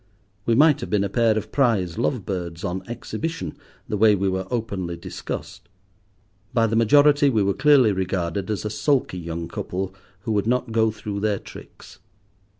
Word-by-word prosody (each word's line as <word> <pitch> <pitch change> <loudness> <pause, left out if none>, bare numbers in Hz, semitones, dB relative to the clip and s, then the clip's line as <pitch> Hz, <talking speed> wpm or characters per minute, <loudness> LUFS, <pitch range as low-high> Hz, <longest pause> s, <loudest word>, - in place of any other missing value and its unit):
We 115 - +3
might 150 +1 +5
have - - -5
been 105 -2 +2
a 100 - -1
pair 115 +1 +2
of 110 0 -4
prize 110 -11 +1
love 120 -9 -1
birds 90 -3 -4
on 90 +1 -2
exhibition, 120 - -5 0.3
the 105 - -2
way 105 0 +5
we 95 0 0
were 95 0 -2
openly 100 -8 -3
discussed. - - -7 0.9
By 115 -1 +4
the 115 0 0
majority 145 +5 +5
we 110 -6 +2
were 100 0 +1
clearly 135 -4 +5
regarded 95 0 -2
as 105 0 -2
a 105 - -2
sulky 105 -3 0
young 85 0 -5
couple 95 +1 -4 0.3
who 110 +2 -3
would 105 0 0
not 125 0 0
go 110 0 +3
through 105 -2 -5
their 105 -1 0
tricks. - - -13
105 Hz, 175 wpm, -23 LUFS, 95-120 Hz, 0.9 s, might